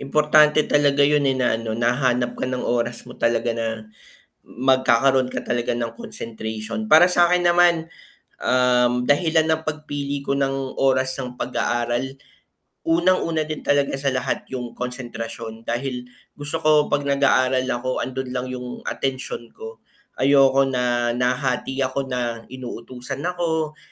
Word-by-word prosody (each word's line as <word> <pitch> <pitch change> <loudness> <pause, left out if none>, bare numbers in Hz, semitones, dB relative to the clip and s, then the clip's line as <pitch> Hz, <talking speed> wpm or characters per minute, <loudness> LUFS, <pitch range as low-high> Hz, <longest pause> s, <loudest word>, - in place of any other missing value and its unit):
importante 150 +1 +4
talaga 145 -1 +3
yun, 145 -1 +2
eh, 130 - +1
na, 125 -3 +1
ano 110 -1 -4
nahanap 120 0 0
ka 130 - -1
ng 125 -1 -3
oras 120 0 -1
mo - - -11
talaga 115 0 0
na, 115 -1 -4 0.6
magkakaroon 130 0 +2
ka - - -3
talaga 120 -1 -2
ng 115 -1 -3
concentration, 110 -1 -3
para 160 +10 +6
sa'kin 175 0 +5
naman, 175 -1 +3 0.5
um, 125 -1 +2
dahilan 160 +1 +2
ng 160 0 0
pagpili 145 -2 -4
ko 140 0 -1
ng 135 -1 -2
oras 130 -1 +2
ng 125 -2 -5
pag-aaral, 120 +1 -2 0.7
unang-una 165 -1 +2
din 155 0 -5
talaga 145 -1 +1
sa 140 - -1
lahat 130 0 -2
yung 125 -2 -6
konsentrasyon, 115 -2 -5
dahil 125 +1 -4 0.3
gusto 145 +2 +4
ko 155 - +3 0.2
pag 145 - 0
nag-aaral 130 -2 +2
ako, 130 +1 -2
'andun 130 0 -5
lang 125 0 -3
yung 125 -1 -7
atensyon 130 -3 -4
ko, 110 0 -10 0.4
ayoko 135 0 +4
na, 120 -2 0
nahahati 125 +2 -1
ako 135 +1 -3
na 120 -2 -3
inutusan 125 +1 -2
ako, 160 -3 -2
130 Hz, 140 wpm, -22 LUFS, 120-145 Hz, 0.7 s, para